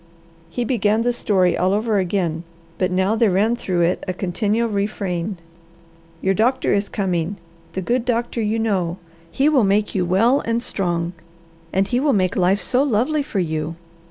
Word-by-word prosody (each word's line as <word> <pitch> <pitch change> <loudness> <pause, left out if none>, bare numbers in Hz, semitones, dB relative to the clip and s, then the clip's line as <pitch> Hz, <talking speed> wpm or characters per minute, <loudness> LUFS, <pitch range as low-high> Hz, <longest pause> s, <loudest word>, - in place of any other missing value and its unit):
He 240 +8 -2
began 220 -2 +1
the 245 0 +1
story 185 -7 +2
all 185 +2 +1
over 215 0 +1
again, 175 -3 -1 0.4
but 185 - +2
now 190 +3 +1
there 225 -1 +3
ran 205 +5 +2
through 185 -7 -1
it 170 +2 +1
a 185 - -1
continual 210 +5 0
refrain. 200 -3 -2 0.9
"Your 190 - +3
doctor 235 +6 +2
is 205 0 0
coming, 185 -1 -1 0.4
the 190 - -3
good 240 +4 0
doctor 235 -1 -1
you 215 +1 0
know. 190 -6 0 0.3
He 275 - +1
will 290 -6 +4
make 205 +1 +1
you 185 - +1
well 220 +10 +3
and 230 +1 -1
strong, 175 -5 -1 0.6
and 195 +1 +1
he 245 +2 +1
will 285 0 +2
make 185 -1 +1
life 190 +2 +2
so 255 - +1
lovely 280 +3 +1
for 275 -7 -5
you." 160 -2 -1
200 Hz, 175 wpm, -21 LUFS, 185-230 Hz, 0.9 s, will